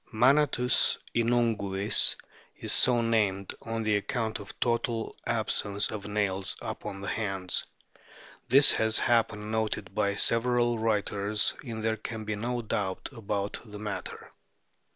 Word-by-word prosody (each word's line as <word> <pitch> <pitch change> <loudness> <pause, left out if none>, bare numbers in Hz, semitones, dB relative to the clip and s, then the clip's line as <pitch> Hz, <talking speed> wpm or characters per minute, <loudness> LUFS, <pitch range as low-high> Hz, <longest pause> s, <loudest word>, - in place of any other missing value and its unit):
Manatus 125 +1 +3 0.2
inunguis 115 -4 +2 0.4
is - - -2
so 120 -2 +4
named 105 -4 0
on 115 -1 -4
account 110 +2 -1
of 100 - -10
the - - -10
total 115 -1 -1
absence 110 -3 +1
of 105 -2 -6
nails 100 -2 -1
upon 95 0 -6
the 100 - -6
hands; 95 -4 -1 0.9
this 135 +3 +8
has 110 0 +2 0.3
been 105 0 -8
noted 105 -3 -2
by 100 -1 0
several 120 +1 +2
writers, 105 -1 +1
and 115 -4 -6
there 110 0 0
can 110 -1 -6
be 105 0 -2
no 120 +3 -3
doubt 100 -3 -3
about 105 -4 -4
the 105 -3 -10
matter. 105 -1 -6
110 Hz, 130 wpm, -28 LUFS, 100-115 Hz, 0.9 s, this